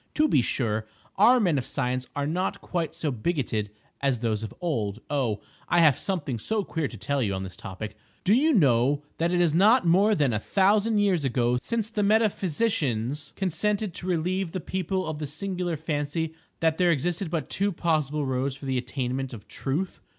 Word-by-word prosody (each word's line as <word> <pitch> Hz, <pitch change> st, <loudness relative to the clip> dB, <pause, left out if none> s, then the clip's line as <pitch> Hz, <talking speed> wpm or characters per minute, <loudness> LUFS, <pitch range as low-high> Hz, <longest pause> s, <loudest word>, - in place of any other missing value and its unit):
To 310 Hz, 0 st, +4 dB
be 135 Hz, -, +4 dB
sure, 110 Hz, -3 st, -1 dB, 0.3 s
our 240 Hz, +6 st, +6 dB
men 175 Hz, -, +2 dB
of -, -, -3 dB
science 130 Hz, -1 st, -2 dB
are 145 Hz, -1 st, -1 dB
not 175 Hz, +5 st, -1 dB
quite 170 Hz, -3 st, -3 dB
so 150 Hz, -, -1 dB
bigoted 115 Hz, -5 st, -1 dB, 0.3 s
as 135 Hz, -3 st, +2 dB
those 110 Hz, -2 st, -1 dB
of 110 Hz, -, -5 dB
old:—oh, 120 Hz, -, -2 dB, 0.3 s
I 175 Hz, -, +4 dB
have 155 Hz, -5 st, +6 dB
something 145 Hz, -, -2 dB
so 215 Hz, -, -1 dB
queer 165 Hz, -5 st, -2 dB
to 115 Hz, -, -10 dB
tell 140 Hz, +7 st, -1 dB
you 100 Hz, -5 st, 0 dB
on 95 Hz, -, -3 dB
this 95 Hz, -2 st, -7 dB
topic. 105 Hz, +4 st, -7 dB, 0.3 s
Do 195 Hz, -, +4 dB
you 295 Hz, +7 st, +4 dB
know 140 Hz, -, +3 dB, 0.2 s
that 170 Hz, +1 st, +1 dB
it 180 Hz, -, +2 dB
is 170 Hz, -3 st, +3 dB
not 205 Hz, +5 st, +5 dB
more 195 Hz, +6 st, +4 dB
than 145 Hz, -8 st, +2 dB
a 105 Hz, -, 0 dB
thousand 205 Hz, -, +2 dB
years 195 Hz, -6 st, +2 dB
ago 125 Hz, -1 st, +1 dB
since 225 Hz, -, -2 dB
the 215 Hz, -, -1 dB
metaphysicians 165 Hz, -, +1 dB
consented 200 Hz, +2 st, -1 dB
to 180 Hz, -, -6 dB
relieve 180 Hz, +1 st, -1 dB
the 185 Hz, -, -2 dB
people 185 Hz, +2 st, -2 dB
of 155 Hz, -1 st, -4 dB
the 150 Hz, -, -3 dB
singular 180 Hz, +2 st, -3 dB
fancy 155 Hz, +1 st, -2 dB, 0.3 s
that 160 Hz, 0 st, +2 dB
there 180 Hz, -1 st, +4 dB
existed 170 Hz, +3 st, -1 dB
but 160 Hz, -4 st, -2 dB
two 200 Hz, +1 st, +1 dB
possible 150 Hz, -4 st, 0 dB
roads 130 Hz, +1 st, -1 dB
for 135 Hz, -, -10 dB
the 130 Hz, -1 st, 0 dB
attainment 130 Hz, +1 st, -3 dB
of 105 Hz, -, -13 dB
Truth! 160 Hz, +8 st, -3 dB
155 Hz, 190 wpm, -26 LUFS, 130-185 Hz, 0.3 s, our